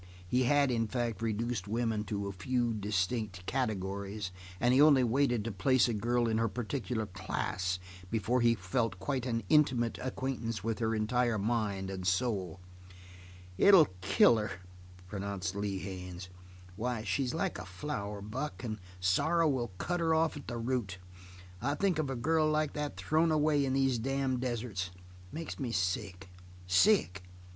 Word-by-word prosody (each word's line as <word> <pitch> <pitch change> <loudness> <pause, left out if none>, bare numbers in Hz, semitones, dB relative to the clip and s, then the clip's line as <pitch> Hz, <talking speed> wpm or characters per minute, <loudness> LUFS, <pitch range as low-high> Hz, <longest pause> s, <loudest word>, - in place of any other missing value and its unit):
He 125 +6 +2
had, 140 +1 +3
in 115 -2 +1
fact, 120 -3 -2
reduced 115 -2 -2
women 110 -1 -1
to 100 0 -3
a 100 - -3
few 120 +4 -1
distinct 100 -2 -2
categories, 100 -5 -2 0.3
and 120 +1 +3
he 135 - +6
only 145 -4 +7
waited 120 -2 +2
to 115 - -2
place 125 +8 +3
a 120 - -1
girl 120 +3 +1
in 110 0 +1
her 115 - +2
particular 120 0 -3
class 90 -1 -2 0.3
before 115 +3 +1
he 115 0 +4
felt 105 +2 -1
quite 130 +7 -2 0.2
intimate 130 -7 +3
acquaintance 125 -5 -3
with 115 +1 -2
her 115 -1 0
entire 115 +1 +1
mind 100 -3 -1
and 95 -1 -4
soul. 95 -3 0 1.0
"It'll 190 -7 +7
kill 115 +4 +5
her," 105 -1 -2 0.6
pronounced 100 -1 -4
Lee 100 -1 -2
Haines. 90 -1 -7 0.5
"Why, 115 +1 -2
she's 130 +1 -1
like - - -1
a 90 - -7
flower, 100 -1 -5
Buck, 130 +9 -5
and 110 -3 -4 0.2
sorrow 150 - +3
will 130 -5 0
cut 175 - -1
her 165 -1 +2
off 160 0 +2
at 145 - -9
the 120 - -4
root. 115 -5 -2 0.8
Think 190 -5 +2
of 150 -3 -1
a 135 - -2
girl 155 +5 +2
like 155 -1 +1
that 150 0 -4
thrown 160 +1 +2
away 150 -2 +3
in 130 -1 0
these 135 -3 +2
damned 135 0 -1
deserts! 115 -7 -2
It - - -19 0.3
makes 165 0 -6
me 125 -4 -2
sick 95 -1 -2 0.4
sick! 100 - +3
115 Hz, 160 wpm, -32 LUFS, 100-130 Hz, 1.0 s, only